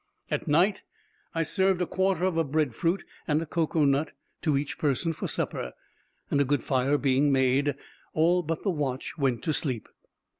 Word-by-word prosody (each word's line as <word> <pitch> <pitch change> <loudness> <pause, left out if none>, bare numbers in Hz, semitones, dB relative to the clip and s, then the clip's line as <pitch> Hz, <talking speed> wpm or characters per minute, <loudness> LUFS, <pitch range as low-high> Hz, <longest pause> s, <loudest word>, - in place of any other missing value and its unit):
At - - -1
night, 175 +7 +3 0.5
I 165 - +2
served 190 +3 +2
a 180 - +1
quarter 190 0 +1
of 185 -3 0
a 165 - +3
bread 150 -3 0
fruit 170 - 0 0.2
and 150 -1 +2
a 165 - -3
cocoa 160 -1 +1
nut 140 +3 +1 0.3
to 150 -4 +2
each 140 0 -3
person 150 +3 +1
for - - -4
supper; 60 - -3 0.6
and 140 - +3
a - - +5
good 140 -2 0
fire 135 +2 +2
being 140 +1 +2
made, 135 +2 +2 0.4
all 170 +3 +4
but 165 -1 -3
the 195 - +1
watch 140 -5 -3
went 130 -4 +1
to 155 - 0
sleep. 130 -7 -2
150 Hz, 185 wpm, -27 LUFS, 140-165 Hz, 0.6 s, a